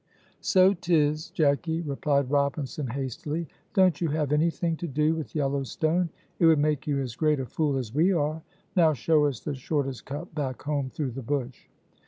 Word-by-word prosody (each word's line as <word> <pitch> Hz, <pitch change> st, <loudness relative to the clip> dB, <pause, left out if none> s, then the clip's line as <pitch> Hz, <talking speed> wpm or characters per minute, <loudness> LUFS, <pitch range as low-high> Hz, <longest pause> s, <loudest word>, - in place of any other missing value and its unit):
"So 190 Hz, 0 st, +4 dB
'tis, 155 Hz, -4 st, +1 dB
Jacky," 160 Hz, +2 st, +1 dB
replied 140 Hz, -3 st, 0 dB
Robinson, 140 Hz, 0 st, 0 dB
hastily; 140 Hz, +6 st, -4 dB, 0.3 s
"don't 185 Hz, -5 st, +4 dB
you 170 Hz, -, +2 dB
have 150 Hz, -2 st, -1 dB
anything 165 Hz, +2 st, +1 dB
to 175 Hz, -, -4 dB
do 150 Hz, +2 st, +1 dB
with 160 Hz, -1 st, -6 dB
yellow 140 Hz, -2 st, 0 dB
stone, 165 Hz, +6 st, 0 dB, 0.3 s
it 165 Hz, -, +5 dB
would 160 Hz, -1 st, +6 dB
make 145 Hz, -1 st, 0 dB
you 140 Hz, -2 st, +1 dB
as 125 Hz, -4 st, -4 dB
great 155 Hz, -1 st, +2 dB
a 130 Hz, -, -2 dB
fool 145 Hz, +1 st, 0 dB
as 120 Hz, -4 st, -4 dB
we 165 Hz, +7 st, +3 dB
are. 155 Hz, -2 st, 0 dB, 0.3 s
Now 165 Hz, -4 st, +5 dB
show 150 Hz, +4 st, +2 dB
us 135 Hz, -6 st, -2 dB
the 150 Hz, -, -3 dB
shortest 135 Hz, -1 st, -2 dB
cut 150 Hz, +6 st, -6 dB
back 135 Hz, -4 st, -3 dB
home 145 Hz, -2 st, -1 dB
through 135 Hz, -1 st, -3 dB
the 135 Hz, +3 st, -6 dB
bush." 130 Hz, 0 st, -3 dB
150 Hz, 185 wpm, -27 LUFS, 135-160 Hz, 0.3 s, would